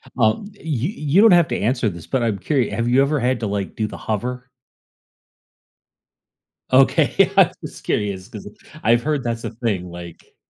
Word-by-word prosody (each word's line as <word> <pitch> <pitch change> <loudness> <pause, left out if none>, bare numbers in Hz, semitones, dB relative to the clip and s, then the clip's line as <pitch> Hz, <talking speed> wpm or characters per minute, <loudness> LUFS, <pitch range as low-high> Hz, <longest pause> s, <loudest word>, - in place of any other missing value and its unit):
Well, 110 - +2
y 200 - -11
you, 150 -1 -1
you 160 -1 +1
don't 225 - +7
have 175 -2 +5
to - - -2
answer 115 0 0
this, 85 -3 -10
but 130 -3 0
I'm 110 -4 -1
curi 125 +4 0
have 115 +3 -2
you 125 +3 +4
ever 140 +1 +1
had 125 0 0
to 110 - -1
like 100 -1 -3
do 110 - -1
the - - -9
hover? 125 +4 -4 2.2
Okay, - - +4
I'm - - +6
just - - -9
curious 100 -3 -2
‘cause - - -10 0.4
I've 120 +1 +3
heard 150 -3 -1
that's 115 -1 -3
a - - -4
thing 110 -6 -3
like 85 -1 -11
120 Hz, 185 wpm, -21 LUFS, 105-135 Hz, 2.2 s, don't